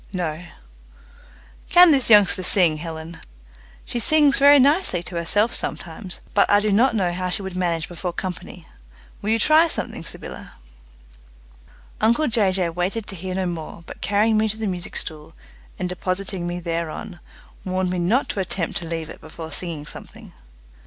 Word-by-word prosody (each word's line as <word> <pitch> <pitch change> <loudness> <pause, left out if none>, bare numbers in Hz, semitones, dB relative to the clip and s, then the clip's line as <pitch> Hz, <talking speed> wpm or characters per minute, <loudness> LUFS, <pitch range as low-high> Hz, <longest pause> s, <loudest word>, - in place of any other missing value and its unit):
"No," 175 -3 -3 1.3
"Can 355 -1 +8
this 270 -5 +3
youngster 205 -3 +6
sing, 175 -4 +3
Helen?" 160 +1 -7 0.7
"She 240 - -3
sings 295 +2 +3
very 285 +1 +7
nicely 280 - +3
to 175 - -8
herself 205 +7 +1
sometimes, 175 +2 -3
but 205 - +3
I 205 - +5
do 210 0 0
not 235 +4 +3
know 180 -4 0
how 185 +1 -3
she 195 +2 +1
would 190 -1 -6
manage 170 -3 -1
before 175 +1 -5
company. 180 -1 -7 0.6
Will 205 - -3
you 225 - +3
try 310 +8 +5
something, - - -4
Sybylla?" - - -9 1.5
Uncle 235 +8 +3
Jay 220 -6 +2
Jay 185 -2 0
waited 180 +6 -2
to 195 - -4
hear 185 +1 -5
no 190 0 -1
more, 170 -1 -6
but - - -11
carrying 215 +2 +2
me 220 0 +1
to 215 - -5
the 220 - -3
music 180 -3 -4
stool, 155 +1 -2 0.4
and 185 - -2
depositing 185 0 -3
me 175 0 -4
thereon, 170 +3 -5 0.4
warned 185 -1 -1
me 180 - -2
not 215 +11 +1
to - - -3
attempt 185 -2 -2
to 170 - -6
leave 165 -1 -4
it - - -12
before 160 0 -9
singing 155 -1 -5
something. - - -12
185 Hz, 170 wpm, -22 LUFS, 170-215 Hz, 1.5 s, Can